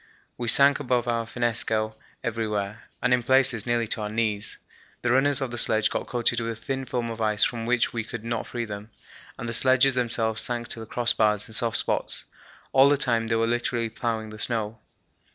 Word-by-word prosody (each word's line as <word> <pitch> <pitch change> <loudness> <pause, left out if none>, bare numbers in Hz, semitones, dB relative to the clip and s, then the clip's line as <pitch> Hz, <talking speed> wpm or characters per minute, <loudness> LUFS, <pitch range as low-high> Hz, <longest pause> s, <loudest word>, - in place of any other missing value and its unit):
We 120 - -4
sank 140 +5 +5
above 120 -1 0
our 115 -1 -1
finnesko 110 -2 -1 0.3
everywhere, 110 -3 -3 0.2
and 125 - +4
in 125 - +3
places 130 -2 +3
nearly 120 -1 +1
to 110 - 0
our 105 - -3
knees. 110 -2 -2 0.5
The 120 - +2
runners 135 +2 +3
of 130 -2 -2
the 120 - -3
sledges 110 -1 +2
got - - -3
coated 120 -1 +2
with 115 0 -2
a - - -10
thin 135 +4 -4
film 120 -2 -2
of 115 0 -6
ice 105 -1 +2
from 115 -1 0
which 125 0 +1
we 115 -1 -2
could 120 0 -7
not 115 0 -3
free 120 -1 -3
them, 105 0 -7 0.5
and 120 - -5
the 115 - -3
sledges 130 +2 +4
themselves 115 -3 0
sank 120 -1 -3
to - - -4
the 110 - -8
crossbars 110 -3 +1
in 110 - -7
soft 115 0 +1
spots. - - 0 0.5
All 135 +1 +6
the 145 - +3
time 115 -4 +1
they 115 - +1
were 115 0 +2
literally 120 0 -1
ploughing 110 -2 -3
the 110 - -10
snow. 110 -1 0
115 Hz, 205 wpm, -26 LUFS, 110-125 Hz, 0.5 s, All